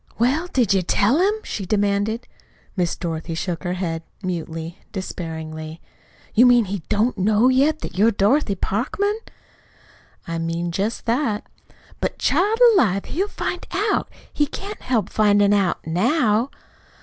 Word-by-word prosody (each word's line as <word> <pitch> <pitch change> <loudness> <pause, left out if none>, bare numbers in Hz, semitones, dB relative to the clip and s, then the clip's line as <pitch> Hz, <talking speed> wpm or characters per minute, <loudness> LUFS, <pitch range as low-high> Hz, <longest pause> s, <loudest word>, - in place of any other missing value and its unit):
"Well, 275 +9 +1
did 240 - +2
you 190 - +3
tell 205 - +2
him?" 395 +3 +3
she 200 - -4
demanded. 205 +4 0 0.5
Miss 175 -3 0
Dorothy 165 -1 -4
shook 170 0 -3
her 175 -1 -1
head, 170 -3 -3 0.2
mutely, 165 -1 -4
despairingly. 160 -4 -6 0.5
"You 245 +3 +6
mean 245 -2 +5
he 195 -1 -4
don't 215 +1 +1
know 215 +5 +4
yet 285 +4 +2
that - - -6
you're 220 +3 +6
Dorothy 210 +2 +2
Parkman?" 395 - -1 1.1
"I 165 0 -3
mean 165 +1 -2
just 200 +7 -2
that." 230 -3 0 0.5
"But, - - -2
child 420 +5 +2 0.2
alive, 200 - +2
he'll 380 +7 -1
find 360 -3 -4
out 410 +4 0 0.2
he 295 - +1
can't 400 +8 -7
help 225 -7 0
finding 205 -1 +4
out 195 -4 +1
now." 220 - +2
205 Hz, 140 wpm, -22 LUFS, 180-255 Hz, 1.1 s, You